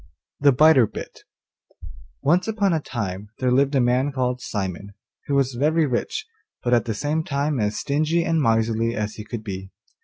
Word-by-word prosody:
THE 140 0 +5
BITER 135 -3 +6
BIT - - -9 1.0
Once 175 +7 +3
upon 205 -4 +1
a 160 - +1
time 105 -7 -5
there 125 -1 0
lived 140 +2 +3
a - - +4
man 125 +3 +2
called 125 -2 -1
Simon, 100 -1 -4 0.3
who 140 - 0
was 135 -1 +2
very 155 +6 +2
rich, 145 - -2 0.4
but 120 - +1
at 120 - +3
the 110 -2 -2
same 150 +7 -1
time 140 -1 -1
as 105 0 -1
stingy 155 +4 +1
and 165 -1 +1
miserly 115 -1 +1
as 105 0 -2
he 105 - -8
could 110 +1 -6
be. 95 -2 -6
125 Hz, 180 wpm, -23 LUFS, 110-150 Hz, 1.0 s, BITER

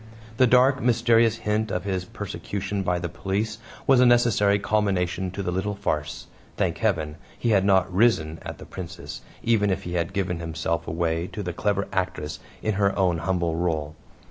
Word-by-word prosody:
The 130 - +5
dark, 130 +2 +4
mysterious 115 -1 +4
hint 110 0 -1
of 90 -2 -2
his 95 -2 -2
persecution 100 +1 -4
by 90 -1 0
the 85 0 -3
police 100 +6 -3 0.3
was 135 -2 +5
a 125 - +6
necessary 115 -4 +4
culmination 95 -3 0
to 100 +2 -5
the 90 - -1
little 100 +3 -1
farce. 80 -6 -3 0.3
Thank 95 -5 0
Heaven! 80 -9 0 0.2
he 120 - -1
had 100 -4 +4
not 95 -2 +3
"risen" 90 -7 +2
at - - -7
the - - -11
Princess, 85 -4 -8 0.2
even 110 -3 +3
if 95 - -1
he 90 - -5
had 85 -1 -1
given 90 -3 -1
himself 85 0 -2
away 80 +1 -1
to 105 - -6
the 90 -2 -3
clever 100 +2 0
actress 90 -5 -2 0.2
in 110 - +1
her 100 -1 +2
own 90 -4 +2
humble 85 -1 0
role. 80 -3 -1
95 Hz, 180 wpm, -25 LUFS, 85-105 Hz, 0.3 s, a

